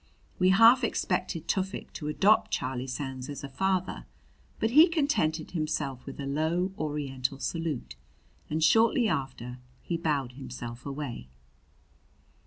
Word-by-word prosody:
We 185 Hz, 0 st, +5 dB
half 230 Hz, +6 st, +7 dB
expected 180 Hz, -6 st, -1 dB
Tufik 190 Hz, 0 st, -2 dB
to 150 Hz, -, -5 dB
adopt 195 Hz, +8 st, +3 dB
Charlie 130 Hz, -1 st, -2 dB
Sands 130 Hz, 0 st, -5 dB
as 140 Hz, -1 st, -6 dB
a -, -, -4 dB
father; 185 Hz, +6 st, -1 dB, 0.5 s
but 220 Hz, -, +1 dB
he 310 Hz, +7 st, +8 dB
contented 280 Hz, -, 0 dB
himself 155 Hz, -6 st, -2 dB
with -, -, -8 dB
a 140 Hz, -, -3 dB
low 160 Hz, +6 st, 0 dB
Oriental 140 Hz, -4 st, -2 dB
salute, 150 Hz, -, -3 dB, 0.5 s
and 155 Hz, +1 st, 0 dB
shortly 225 Hz, +7 st, +4 dB
after 130 Hz, -, -3 dB, 0.2 s
he 170 Hz, -, -2 dB
bowed 145 Hz, -6 st, -1 dB
himself 125 Hz, -1 st, -8 dB
away. 135 Hz, -, -5 dB
155 Hz, 130 wpm, -29 LUFS, 135-185 Hz, 0.5 s, he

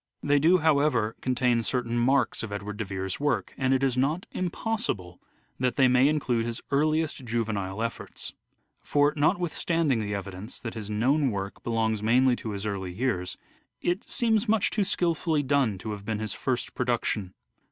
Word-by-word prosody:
They 145 Hz, 0 st, +3 dB
do, 170 Hz, +5 st, +5 dB
however, 145 Hz, -8 st, +2 dB
contain 125 Hz, -2 st, +2 dB
certain 120 Hz, 0 st, -1 dB
marks 130 Hz, +4 st, +2 dB
of 115 Hz, -, -5 dB
Edward 100 Hz, 0 st, -5 dB
de 110 Hz, -, -2 dB
Vere's 95 Hz, -1 st, -3 dB
work, 145 Hz, 0 st, 0 dB
and 130 Hz, -1 st, 0 dB
it 135 Hz, 0 st, +2 dB
is 130 Hz, -2 st, +2 dB
not 145 Hz, +8 st, 0 dB
impossible 180 Hz, -, -2 dB, 0.4 s
that 125 Hz, -1 st, +1 dB
they 130 Hz, -, +5 dB
may 125 Hz, +2 st, +5 dB
include 135 Hz, -6 st, +1 dB
his 115 Hz, -1 st, -3 dB
earliest 155 Hz, 0 st, +1 dB
juvenile 110 Hz, -4 st, -2 dB
efforts. 115 Hz, -, -5 dB, 0.5 s
For 145 Hz, 0 st, +2 dB
notwithstanding 160 Hz, -2 st, +1 dB
the 105 Hz, -1 st, -2 dB
evidence 100 Hz, +3 st, -6 dB
that 115 Hz, -, -5 dB
his 110 Hz, -2 st, -6 dB
known 130 Hz, +7 st, +2 dB
work 100 Hz, -2 st, -4 dB
belongs 110 Hz, -2 st, 0 dB
mainly 125 Hz, +3 st, +4 dB
to 110 Hz, -, -6 dB
his 100 Hz, 0 st, -4 dB
early 95 Hz, -3 st, -3 dB
years, 90 Hz, -4 st, -2 dB, 0.4 s
it 175 Hz, +4 st, -2 dB
seems 225 Hz, -3 st, +2 dB
much 220 Hz, -2 st, +3 dB
too 210 Hz, -, +1 dB
skilfully 165 Hz, -4 st, +1 dB
done 135 Hz, -7 st, +2 dB
to 110 Hz, +4 st, -5 dB
have 105 Hz, -1 st, -6 dB
been 110 Hz, +1 st, -2 dB
his 110 Hz, -2 st, -2 dB
first 130 Hz, -2 st, -2 dB
production. 115 Hz, -6 st, -1 dB
125 Hz, 170 wpm, -27 LUFS, 105-145 Hz, 0.5 s, do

